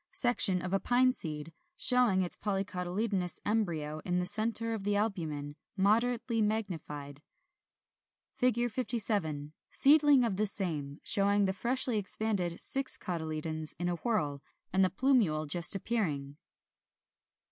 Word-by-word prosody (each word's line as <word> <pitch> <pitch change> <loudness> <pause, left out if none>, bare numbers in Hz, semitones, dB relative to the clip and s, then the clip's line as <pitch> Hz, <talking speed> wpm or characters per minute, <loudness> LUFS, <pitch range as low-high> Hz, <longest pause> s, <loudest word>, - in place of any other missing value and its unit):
56. - - 0
Section 200 -7 +5
of 185 +1 -5
a 195 - +1
Pine 255 +3 +1
seed, 155 - -7 0.2
showing 245 - +4
its 175 - 0
polycotyledonous 190 -1 -3
embryo 165 -8 -3
in 180 -1 -2
the 180 - -2
centre 225 +3 +1
of 215 -3 -6
the 205 0 -1
albumen, 160 -9 -4 0.2
moderately 230 +3 0
magnified. 160 -10 -5 1.1
57. 220 - -2 0.2
Seedling 290 -2 +4
of 215 -2 +1
same, 155 -8 -2
showing 200 0 +5
the 190 - -2
freshly 245 +1 +2
expanded 195 -4 -2
six 270 -1 +2
cotyledons 155 -2 -4
in 175 +1 -3
a 175 - -4
whorl, 150 - -3 0.3
and 190 0 +2
the 185 - +1
plumule 190 - 0
just 170 +4 +5
appearing. 155 -10 -4
195 Hz, 125 wpm, -29 LUFS, 160-225 Hz, 1.1 s, Section